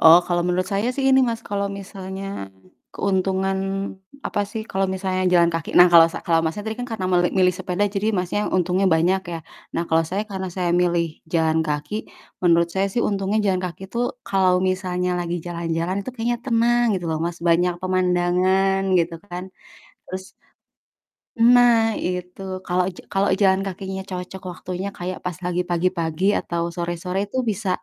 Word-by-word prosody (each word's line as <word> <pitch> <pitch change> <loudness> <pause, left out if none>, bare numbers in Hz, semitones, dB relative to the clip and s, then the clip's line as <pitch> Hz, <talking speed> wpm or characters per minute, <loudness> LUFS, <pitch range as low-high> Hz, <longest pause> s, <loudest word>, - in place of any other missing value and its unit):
Oh, 165 +1 +9
kalo 175 -1 +1
menurut 180 +1 0
saya 200 +4 +1
sih 275 - -2
ini, 265 0 +6
Mas, 230 -1 -2
kalo 200 0 -1 0.2
misalnya 190 0 -7 0.7
keuntungan, 190 0 0 0.7
apa - - -1
sih, 220 - -4
kalo 190 0 0
misalnya 185 0 -1
jalan 170 -1 +5
kaki 165 -1 -3
nah 180 - +10
kalau 165 -1 +9
sa - - -4
kalau 165 -1 +3
Masnya 165 +6 -2
tadi 220 0 -4
kan 245 - -4
karena 195 -4 -3
meli 175 -1 +4
milih 185 -1 +5
sepeda 190 +1 -1
jadi 200 +2 0
Masnya 180 +3 -1 0.2
untungnya 185 +2 +2
banyak, 175 +4 +2
ya. 165 - -3 0.4
Nah - - +1
kalo 160 0 +4
saya 195 +3 0
karena 190 -1 -4
saya 180 -2 0
milih 175 -1 +2 0.3
jalan 160 -1 +2
kaki, 150 +6 -3 0.5
menurut 170 -1 +4
saya 195 +1 +1
sih 235 - +1
untungnya 200 +1 0
jalan 185 -2 +2
kaki 180 0 -6
tuh 235 +1 0 0.2
kalo 195 -1 +2 0.2
misalnya 180 -1 -1
lagi 175 0 -2
jalan-jalan 170 +1 -2
itu 200 - -6
kayaknya 240 0 -1
tenang 240 0 +3
gitu 175 - -5
loh, 160 - -1
Mas, 170 0 -3
banyak 175 +2 +3
pemandangan 185 +1 +2 0.2
gitu 170 0 0
kan. 180 +1 -5 0.6
Terus 185 +1 -5 1.2
Nah, 235 -1 +5
itu. 180 +1 -4 0.2
Kalau 180 0 +1
ja - - -11
kalau 195 +1 +2
jalan 190 -1 +4
kakinya 190 0 -5
cocok 180 0 -6
waktunya 185 +2 -5
kayak 180 +1 -4
pas 180 -3 -3
lagi 180 0 0
pagi-pagi 175 -1 0
atau 170 -1 -3
sore-sore 175 +2 -3
tuh 260 - 0
bisa, 205 -1 -2
185 Hz, 170 wpm, -22 LUFS, 175-195 Hz, 1.2 s, nah